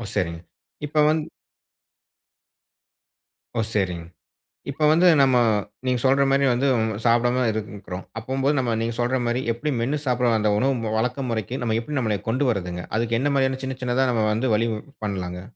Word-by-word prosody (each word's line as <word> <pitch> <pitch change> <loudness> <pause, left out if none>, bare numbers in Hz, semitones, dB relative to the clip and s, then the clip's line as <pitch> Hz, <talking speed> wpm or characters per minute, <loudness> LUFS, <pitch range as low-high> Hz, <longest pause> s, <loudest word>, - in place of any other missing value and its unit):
சரிங்க. 85 -4 -1 0.5
இப்ப 150 +1 -1
வந்து 155 0 0 2.3
ஓ - - +2
சரிங். 90 -5 -1 0.7
இப்ப 140 +3 -4
வந்து 170 +3 +5
நம்ம 130 -2 +4 0.5
நீங்கச் 125 -2 0
சொல்ற 135 +1 +4
மாரி 140 0 +3
வந்து 125 +3 +1 0.4
சாப்பிடாம 120 +2 +3
இருக்கிறோம். 105 -3 -6 0.2
அப்போம் 130 +4 -3
நம்ம 120 -3 0
நீங்கச் 115 +1 -3
சொல்ற 125 +2 +1
மாரி 120 +2 0
எப்படி 150 +6 -3
மேன்னு 135 +6 -1
சாப்பிட 125 -1 +2
வந்த 105 -1 +2
உணவு 115 -2 0
வழக்க 125 +4 -1
முறைக்கு 115 +2 -3
நம்ம 110 -2 0
எப்படி 145 +5 -4
நம்மள 110 -4 0
கொண்டு 130 +5 +1
வர்றதுங்க. 90 -4 -4
அதுக்கு 115 0 0
என்ன 145 +1 +1
மாதிரியான 130 -1 +1
சின்ன 130 -1 -4
சின்னதா 125 +1 +1
நம்ம 110 -3 +1
வந்து 120 +4 0
வழி 115 +2 +1 0.4
பண்ணலாங்க. 90 -3 -4
120 Hz, 155 wpm, -23 LUFS, 110-130 Hz, 2.3 s, வந்து